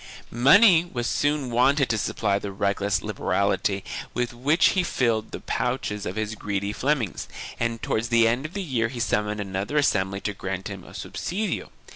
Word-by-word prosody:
Money 170 - +6
was 125 -9 -4
soon 145 -1 0
wanted 135 +3 +3
to 115 - 0
supply 100 -1 0
the 100 0 -5
reckless 100 0 0
liber 105 -2 -6
ality 100 0 +1 0.3
with 125 0 -1
which 140 +8 +3
he 185 - +2
filled 115 -9 0
the - - -6
pouches 120 -5 -2
of - - -4
his 110 0 -2
greedy 100 -1 -3
Flemings, 130 -6 -1 0.3
and 115 -1 -2
towards 110 +2 0
the 115 -1 +4
end 120 +4 +1
of 160 - -18
the 200 - -2
year 125 -9 0
he 120 +1 -7
summoned 105 -2 0
another 100 +7 -3
assembly 100 -9 +1
to 105 - -2
grant 95 -1 -5
him - - -7
a - - -13
subsidio. 205 +5 -3
115 Hz, 180 wpm, -25 LUFS, 100-135 Hz, 0.3 s, Money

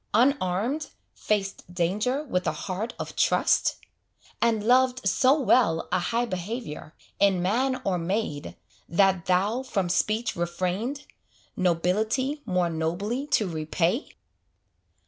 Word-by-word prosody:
Unarmed, 245 - +1 0.2
faced 195 -4 -2
danger 210 - 0
with 185 -10 -2
a - - +3
heart 205 +5 -3
of - - -6
trust? - - +2 0.7
And 225 -3 +2
loved 250 -1 +3
so 265 +9 +4
well 225 - +3
a 185 - +2
high 230 +7 0
behaviour, 185 -5 -5 0.2
In 195 -2 +4
man 255 +7 +1
or 185 -3 +1
maid, 170 -4 -3 0.3
that 190 0 +2
thou 200 +7 +2
from 195 -9 -2
speech 215 +6 0
refrained, 185 +10 -2 0.5
Nobility 215 - 0
more 180 -2 +1
nobly 195 - -2
to 215 -8 +2
repay? 165 - -1
200 Hz, 115 wpm, -26 LUFS, 180-245 Hz, 0.7 s, so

